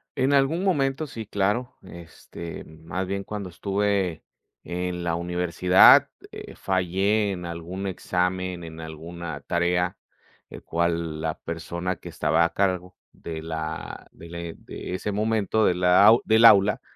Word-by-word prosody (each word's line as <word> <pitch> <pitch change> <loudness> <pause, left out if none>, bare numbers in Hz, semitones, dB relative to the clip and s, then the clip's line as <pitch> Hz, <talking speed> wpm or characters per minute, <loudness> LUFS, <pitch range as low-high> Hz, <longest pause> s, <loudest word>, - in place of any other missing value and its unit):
En 135 +2 +1
algún 140 +7 +2
momento, 145 -5 0
sí, 115 -4 -7
claro. 105 +5 -1
Este, 85 -1 -10
más 80 +4 -6
bien 100 +1 -3
cuando 100 -2 -6
estuve 100 -1 -1 0.4
en 90 0 -4
la 85 -1 0
universidad, 90 +1 +5 0.2
eh, - - -10
fallé, 95 +3 0
en 90 -2 -5
algún 85 +3 -5
examen, 90 -1 -2
en 80 -1 -9
alguna 80 +2 -7
tarea, 90 +1 0 0.5
el - - -11
cual 85 -2 -1
la 80 0 -2
persona 85 +2 -4
que - - -11
estaba 85 - +1
a 85 - 0
cargo 90 -2 -1 0.2
de 80 -2 -7
la 80 0 -6
de 85 - -13
le 85 -1 -6
de - - -8
ese 105 +2 -3
momento 110 +1 +1
de 90 - +3
la 90 +2 +5
au 115 +3 +7
del 110 +1 +5
aula, 105 -2 +6
90 Hz, 145 wpm, -25 LUFS, 85-100 Hz, 0.5 s, au